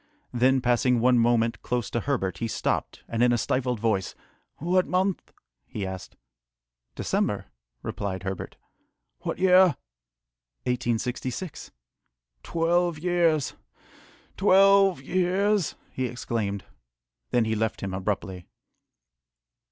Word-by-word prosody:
Then, 130 +2 +3
passing 125 0 +2
one 125 +1 +4
moment 115 0 +2
close 125 -2 -2
to 120 - 0
Herbert, 115 -8 -2
he 115 - -1
stopped, - - -2
and 115 0 -2
in 120 0 +5
a 120 - +3
stifled 125 0 -1
voice, 105 -4 0 0.4
"What 180 +4 +1
month?" 185 +1 0 0.4
he 100 - -4
asked. 95 -1 -7 0.8
"December," - - -1 0.3
replied 95 -2 -4
Herbert. 95 -1 -5 0.6
"What - - -4
year?" 185 0 +5 0.9
"1866." 125 +5 -2 0.7
"Twelve 170 - +1
years! 165 -3 +1 0.8
twelve 195 -4 +5
years!" 185 +3 +1 0.2
he 130 -1 -2
exclaimed. 115 -5 -3 0.6
Then 120 -2 +2
he 110 - 0
left 110 0 -1
him 95 -1 -4
abruptly. 95 -2 -3
125 Hz, 105 wpm, -26 LUFS, 110-175 Hz, 0.9 s, in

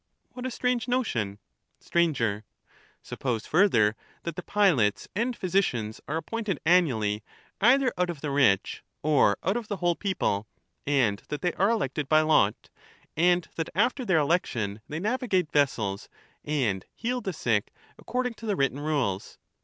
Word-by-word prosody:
What 255 0 -5
a - - -2
strange 250 -1 -1
notion 120 - -1 0.4
I 170 -1 +2
Sir, 110 -3 -1 0.6
Suppose 120 -4 -3
further, 120 - +3 0.3
that 170 - -4
the 180 - -4
pilots 170 - +2
and 235 +4 0
physicians 150 - -1
are 155 - -1
appointed 210 -1 -3
annually, 125 - +3 0.4
either 255 +3 +4
out 180 -1 +2
of 160 -5 -5
the 150 - -3
rich, 130 -9 +2 0.2
or 145 -9 +4
out 190 +4 +1
of 235 -3 -5
the 205 - -2
whole 175 -1 +2
people, 165 - -1 0.4
and 125 -8 +2
that 150 -1 -4
they 175 - +1
are 195 +3 +2
elected 150 - -1
by 155 0 +6
lot; 155 -10 +2 0.4
and 175 +2 +3
that 165 - -2
after 245 +6 +1
their 190 -7 +2
election 120 - 0
they 155 - -3
navigate 205 - 0
vessels 110 -9 0 0.3
and 125 -11 -1
heal 245 +1 -2
the 195 - -3
sick 115 - 0 0.3
according 250 -1 -2
to 225 0 -9
the 205 - +1
written 135 -3 0
rules. 140 -11 -2
160 Hz, 155 wpm, -27 LUFS, -, 0.6 s, by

